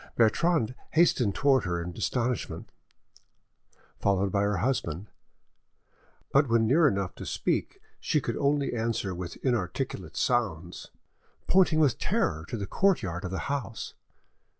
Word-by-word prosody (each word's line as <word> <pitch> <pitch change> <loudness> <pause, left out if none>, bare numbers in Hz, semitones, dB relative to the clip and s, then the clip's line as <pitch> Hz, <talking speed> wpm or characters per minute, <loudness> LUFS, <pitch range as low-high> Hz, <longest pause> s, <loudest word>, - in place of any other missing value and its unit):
Bertrande 125 +3 +2 0.2
hastened 130 - +3
towards 135 -7 +3
her 85 -1 -1
in 85 0 -6
astonishment, 125 0 -2 1.3
followed 100 -1 +1
by 100 - +1
her 100 -1 +1
husband, 95 - -2 1.2
but 140 -1 +4
when 115 -1 +3
near 150 +7 +5
enough 100 -6 -1
to - - -9
speak - - -2 0.2
she - - +1
could - - -3
only 140 -1 +1
answer 110 -4 -1
with 90 -1 -6
inarticulate 95 - -2
sounds, 90 -9 -1 0.6
pointing 180 -4 +4
with 135 -7 +3
terror 80 0 0
to - - -3
the 100 - -3
courtyard 100 - 0
of - - -3
the 95 - -3
house. 135 -6 -4
115 Hz, 130 wpm, -28 LUFS, 95-135 Hz, 1.3 s, near